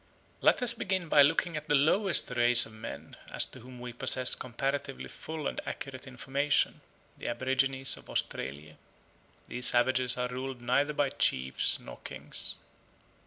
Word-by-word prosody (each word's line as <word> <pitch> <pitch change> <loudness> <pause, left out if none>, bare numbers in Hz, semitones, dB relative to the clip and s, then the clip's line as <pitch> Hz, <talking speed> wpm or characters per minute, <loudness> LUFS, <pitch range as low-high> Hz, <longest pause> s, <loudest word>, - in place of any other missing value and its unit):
Let - - +3
us 240 -1 +3
begin 190 -6 -3
by 145 - +6
looking 165 +4 +2
at 155 0 -6
the 145 - +2
lowest 170 +4 +6
race 120 -1 +5
of 115 - -13
men 110 +1 -9 0.2
as - - 0
to - - -13
whom 125 +1 -13
we 120 0 -8
possess 130 +1 +4
comparatively 135 +2 -4
full 155 -2 -8
and - - -3
accurate 130 -1 -7
information, 135 +3 -1 0.4
the - - -6
aborigines 135 +2 0
of - - -15
Australia. 75 +3 -4 0.7
These 125 0 0
savages 125 0 +2
are 125 0 -1
ruled 130 +1 -6
neither 140 +5 0
by 145 -2 0
chiefs 65 0 0
nor - - -11
kings. - - -6
130 Hz, 155 wpm, -29 LUFS, 120-145 Hz, 0.7 s, by